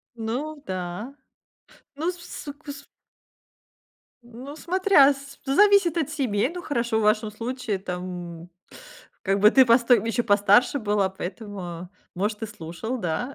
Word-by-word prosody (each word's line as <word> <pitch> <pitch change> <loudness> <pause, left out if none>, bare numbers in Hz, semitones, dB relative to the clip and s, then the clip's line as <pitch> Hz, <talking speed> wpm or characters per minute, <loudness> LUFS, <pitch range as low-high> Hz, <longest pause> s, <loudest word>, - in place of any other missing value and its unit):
Ну 265 +7 -4
да, 185 +7 -5 0.8
ну, 320 +5 -1
с 360 - -12
вс 350 0 -9
су 285 - -7
кус 285 -1 -10 1.4
Ну, 245 +4 -10
смотря 350 -4 +4
с 275 0 -12
зависит 370 +4 +4
от 320 -5 0
семей. 250 -7 0
Ну, 355 - -6
хорошо, 235 -7 -1
в - - 0
вашем 215 0 +2
случае 230 -2 -3
там, 180 -2 -7 0.7
как 195 +1 0
бы, 210 +1 +7
ты 265 +1 +6
постой 235 +1 +5
м, - - -5
еще 230 +1 0
постарше 205 +5 +4
была, 205 -4 +1
поэтому, 185 -2 -7 0.2
может, 210 +4 -2
и - - -1
слушал, 210 +5 -6
да. 210 +8 -3
230 Hz, 145 wpm, -25 LUFS, 200-280 Hz, 1.4 s, бы